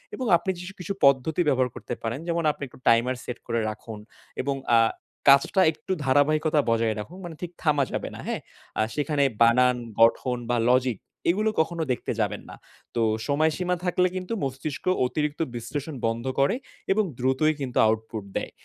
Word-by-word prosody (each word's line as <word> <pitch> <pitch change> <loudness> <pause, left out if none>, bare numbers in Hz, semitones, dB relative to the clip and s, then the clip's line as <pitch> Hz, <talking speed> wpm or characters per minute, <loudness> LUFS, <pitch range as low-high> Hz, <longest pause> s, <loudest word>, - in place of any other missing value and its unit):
এবং 255 - -4
আপনি 190 +3 -2
জিশু 180 +2 -8
কিছু 180 +3 -3
পদ্ধতি 140 +5 +3
ব্যবহার 130 -3 +2
করতে - - -6
পারেন 115 +3 -2
যেমন 170 -1 0
আপনি 145 - -9
একটু 125 - -17
টাইমার 120 +3 +4
সেট 120 - -5
করে 115 -1 0
রাখুন 110 0 -8 0.4
এবং 140 +1 -1 0.2
আ - - +7 0.5
কাজটা 140 +7 +5
একটু 165 - -9
ধারাবাহিকতা 150 +3 +3
বজায় 115 -1 +2
রাখুন। 170 - -8
মানে 170 -2 -7
ঠিক 175 -1 -5
থামা 150 -3 +3
যাবে - - -3
না। - - -9
হ্যাঁ? - - -2 0.4
আ - - +4
সেখানে 145 -1 +1 0.2
বানান 125 +2 +5 0.2
গঠন 125 +2 +4
বা 120 - +2
লজিক 125 -3 +3 0.3
এগুলো 210 +5 +2
কখনো 165 +1 -2
দেখতে 125 - -2
যাবেন - - -1
না। - - -9 0.4
তো 120 - +1 0.3
সময়সীমা 160 +5 +1
থাকলে 180 0 +2
কিন্তু 185 +3 -4
মস্তিষ্ক 135 +4 -4 0.2
অতিরিক্ত 150 +4 -2
বিশ্লেষণ 145 +6 -5
বন্ধ 115 +2 -1
করে 140 - +3 0.4
এবং 215 +2 +3
দ্রুতই 130 +5 +2
কিন্তু 125 -2 -3
আউটপুট 110 -1 -2
দেয়। - - -4
140 Hz, 170 wpm, -26 LUFS, 120-160 Hz, 0.5 s, আ